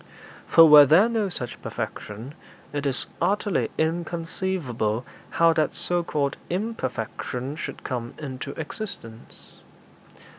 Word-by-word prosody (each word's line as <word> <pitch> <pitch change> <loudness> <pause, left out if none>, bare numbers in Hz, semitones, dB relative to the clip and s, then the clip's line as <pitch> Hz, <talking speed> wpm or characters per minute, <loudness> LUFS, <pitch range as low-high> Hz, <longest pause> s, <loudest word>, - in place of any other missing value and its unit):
For 165 - +8
were 150 -2 +10
there 180 - +6
no 225 -4 0
such 125 -9 -6
perfection, 110 +7 -6 0.4
it 145 -1 -1
is 135 -1 0 0.2
utterly 205 -1 +1
inconceivable 165 - -2 0.2
how 165 0 +4
that 155 -2 0
so 175 0 0
called 145 -4 -1
_im_perfection 135 - -3
should - - -6
come 120 -2 -4
into 140 -2 -6
existence. 150 - -8
150 Hz, 110 wpm, -25 LUFS, 125-175 Hz, 0.4 s, were